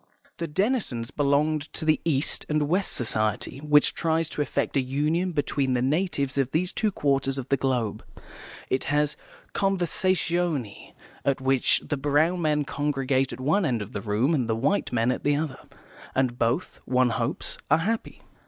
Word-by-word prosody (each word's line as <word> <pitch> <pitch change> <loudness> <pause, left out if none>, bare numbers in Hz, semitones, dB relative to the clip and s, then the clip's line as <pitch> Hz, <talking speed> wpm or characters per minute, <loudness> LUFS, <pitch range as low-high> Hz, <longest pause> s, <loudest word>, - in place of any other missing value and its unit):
The 170 - -2
Denisons 150 - -1
belonged 150 +1 +1
to 160 - -3
the 155 -1 +3
East 150 -3 +1
and 150 -1 +1
West 185 +5 +1
Society, 110 +1 0
which 150 0 +4
tries 165 -1 0
to - - -3
effect 145 - -1
a 135 - +4
union 150 +8 0
between 140 -4 0
the 120 - +1
natives 140 -2 0
of 135 -2 +1
these 175 +5 0
two 215 -1 +2
quarters 135 -4 0
of 130 - -5
the 140 - +4
globe. 125 -5 -1 0.6
It 130 - -1
has 150 0 +1 0.4
conversazioni, 175 - 0 0.3
at 140 -1 +1
which 130 -1 +2
the 145 - -2
brown 150 +6 +2
men 150 -2 +1
congregate 135 -2 0
at - - -7
one 155 +10 +2
end 120 -9 0
of 100 - -12
the 100 - -3
room 110 +9 +1
and 125 -7 0
the 110 - +2
white 145 - 0
men 120 0 +2
at - - -3
the 145 0 +3
other, 145 -3 -3 0.6
and 130 -2 0
both, 120 +10 0
one 125 -1 +2
hopes, 115 +4 -2
are 155 - +5
happy. 220 +7 -3
145 Hz, 170 wpm, -26 LUFS, 130-160 Hz, 0.6 s, are